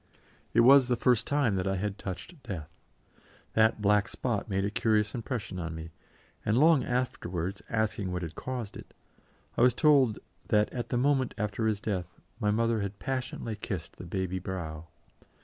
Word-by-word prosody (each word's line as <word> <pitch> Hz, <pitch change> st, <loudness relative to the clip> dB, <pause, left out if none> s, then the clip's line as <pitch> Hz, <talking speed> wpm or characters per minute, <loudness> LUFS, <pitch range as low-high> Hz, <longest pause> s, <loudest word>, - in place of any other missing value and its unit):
It 115 Hz, -, +7 dB
was 130 Hz, +1 st, +7 dB
the 125 Hz, -, +2 dB
first 120 Hz, -1 st, +2 dB
time 135 Hz, -9 st, +2 dB
that 95 Hz, +1 st, -1 dB
I 95 Hz, -, +1 dB
had 100 Hz, +1 st, -3 dB
touched 120 Hz, -, -7 dB
Death. 85 Hz, -, -6 dB, 0.8 s
That 110 Hz, -1 st, +3 dB
black 105 Hz, +1 st, +4 dB
spot 115 Hz, -4 st, -2 dB
made 95 Hz, 0 st, 0 dB
a 100 Hz, -, -1 dB
curious 105 Hz, -1 st, +2 dB
impression 115 Hz, -5 st, -4 dB
on 85 Hz, -1 st, -4 dB
me, 80 Hz, +1 st, -7 dB, 0.5 s
and 105 Hz, +2 st, +2 dB
long 155 Hz, -1 st, +5 dB
afterwards, 95 Hz, -8 st, -2 dB
asking 110 Hz, -4 st, -1 dB
what 90 Hz, 0 st, -2 dB
had 80 Hz, -2 st, -5 dB
caused 120 Hz, 0 st, -5 dB
it, -, -, -11 dB, 0.6 s
I -, -, 0 dB
was 125 Hz, -1 st, +5 dB
told 140 Hz, -8 st, +4 dB, 0.3 s
that 105 Hz, 0 st, +2 dB
at 120 Hz, -2 st, -4 dB
the 125 Hz, -, 0 dB
moment 130 Hz, 0 st, +2 dB
after 105 Hz, +2 st, -1 dB
his 105 Hz, -2 st, +1 dB
death 90 Hz, -5 st, -4 dB, 0.2 s
my 105 Hz, -3 st, +1 dB
mother 115 Hz, +1 st, +2 dB
had 100 Hz, 0 st, -4 dB
passionately 130 Hz, -3 st, -3 dB
kissed 95 Hz, -5 st, -5 dB
the -, -, -8 dB
baby 95 Hz, 0 st, -2 dB
brow. 85 Hz, -4 st, -5 dB
105 Hz, 175 wpm, -29 LUFS, 95-120 Hz, 0.8 s, It